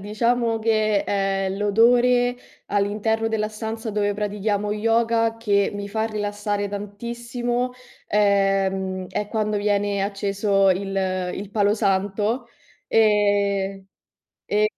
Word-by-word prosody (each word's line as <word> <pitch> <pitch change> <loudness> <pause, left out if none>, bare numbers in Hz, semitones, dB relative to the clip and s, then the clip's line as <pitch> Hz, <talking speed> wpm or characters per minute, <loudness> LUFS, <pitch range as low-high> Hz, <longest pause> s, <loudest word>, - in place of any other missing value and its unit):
diciamo 225 +2 0
che, 215 -2 +2
ehm, 195 -1 -1
l'odore 245 +4 +3 0.3
all'interno 210 +2 0
della 215 -1 -1
stanza 220 +1 -5
dove 205 -1 0
pratichiamo 210 0 -1
yoga 225 +1 +1
che 205 -3 +1
mi 205 0 -5
fa 220 +2 -1
rilassare 205 -1 -2
tantissimo, 235 +4 -3 0.3
ehm, 195 -2 +1
è 210 - -3
quando 215 0 -1
viene 205 -1 0
acceso 200 -1 +1
il 195 +1 -1 0.4
il 200 0 -7
palo 205 -1 +2
santo. 205 +3 0 0.4
Ehm, 200 -2 +2 0.6
è 210 +1 +1
210 Hz, 105 wpm, -23 LUFS, 200-225 Hz, 0.6 s, l'odore